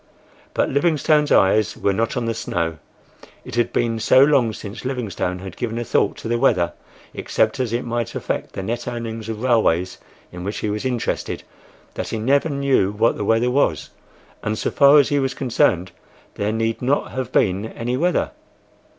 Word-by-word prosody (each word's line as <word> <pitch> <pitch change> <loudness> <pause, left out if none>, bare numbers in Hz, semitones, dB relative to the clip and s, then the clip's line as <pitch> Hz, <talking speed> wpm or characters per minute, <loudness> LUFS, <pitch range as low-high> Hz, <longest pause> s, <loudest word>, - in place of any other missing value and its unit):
But - - +2
Livingstone's 150 0 +2
eyes 105 +2 +3
were 100 - +1
not 115 +5 -1
on 120 - -1
the 115 - 0
snow. 85 -6 -3 0.7
It - - -9
had 120 0 +1
been 115 -1 0
so 110 +4 +5
long 135 -6 +3
since 105 +1 -8
Livingstone 115 -8 -3
had 95 -1 -8
given 115 -1 -3
a 120 - -2
thought - - +1
to - - -7
the 120 +1 0
weather, 90 -10 +2 0.4
except - - 0
as 125 -4 -1
it 120 +1 -2
might 120 -2 -3
affect - - -3
the 95 - -5
net 115 +5 -3
earnings 115 -2 -5
of 110 +1 -5
railways 95 -8 +2 0.3
in 90 0 -8
which 100 +3 -4
he 105 - -2
was 105 +4 -3
interested, 125 -3 -2 0.5
that - - -4
he - - -3
never 140 +8 +2
knew 140 -8 +2
what 110 +3 +2
the - - -3
weather 115 +4 +2
was, 140 +3 0 0.5
and 110 +1 -2
so - - -1
far 140 +1 +6
as 145 - +4
he 145 - +2
was 135 -1 -1
concerned 95 -9 +1 0.4
there 100 +1 -1
need 115 0 -1
not 135 +3 0
have 130 -2 -4
been 100 +2 +1
any 120 +2 -3
weather. 175 +6 +1
115 Hz, 185 wpm, -21 LUFS, 105-130 Hz, 0.7 s, far